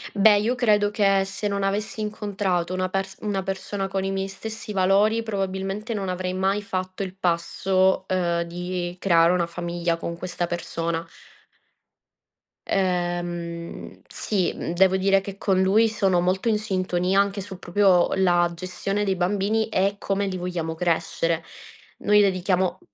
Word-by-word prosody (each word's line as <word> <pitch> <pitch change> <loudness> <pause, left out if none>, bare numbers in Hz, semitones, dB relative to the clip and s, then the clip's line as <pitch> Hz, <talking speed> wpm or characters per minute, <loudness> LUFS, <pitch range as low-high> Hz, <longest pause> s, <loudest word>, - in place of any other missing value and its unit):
Beh, 205 0 +6
io 230 +5 0
credo 210 -4 +3
che 195 -2 +3
se 195 +2 -4
non 200 0 -1
avessi 205 +2 -2
incontrato 200 -4 -2
una 185 0 -1
perso 195 +1 -3
una 195 -2 -1
persona 195 +1 -3
con 190 0 -2
i 195 - -1
miei 195 0 -2
stessi 215 +2 -7
valori 200 +4 +3
probabilmente 195 +1 -3
non 195 -3 -3
avrei 180 0 -2
mai 195 +2 0
fatto 185 0 -3
il 185 -1 -6
passo, 185 +1 +1
ehm, 175 -2 0
di 175 +1 -4
creare 170 -2 +4
una 175 -2 +1
famiglia 170 0 -2
con 170 0 -5
questa 175 -1 -3
persona. 170 -1 -3 1.6
Ehm, 175 -2 -2
sì. 195 -5 -1
Mhmm, 170 - -4
devo 190 +1 +4
dire 195 0 +3
che 195 0 -8
con 190 -2 +1
lui 215 +4 +4
sono 195 -4 +2
molto 190 +5 +1
in 210 -1 +2
sintonia, 185 -2 0
anche 200 0 +1
su 190 -1 -8
proprio 180 -1 +3
la 175 -2 +3
gestione 185 +3 -3
dei 195 -2 +1
bambini 205 +4 0
e 200 0 +1
come 200 0 -1
li 185 -1 -3
vogliamo 175 -2 -3
crescere. 165 -1 0 0.6
Noi 210 0 +4
dedichiamo 185 -1 +1
190 Hz, 150 wpm, -24 LUFS, 175-200 Hz, 1.6 s, Beh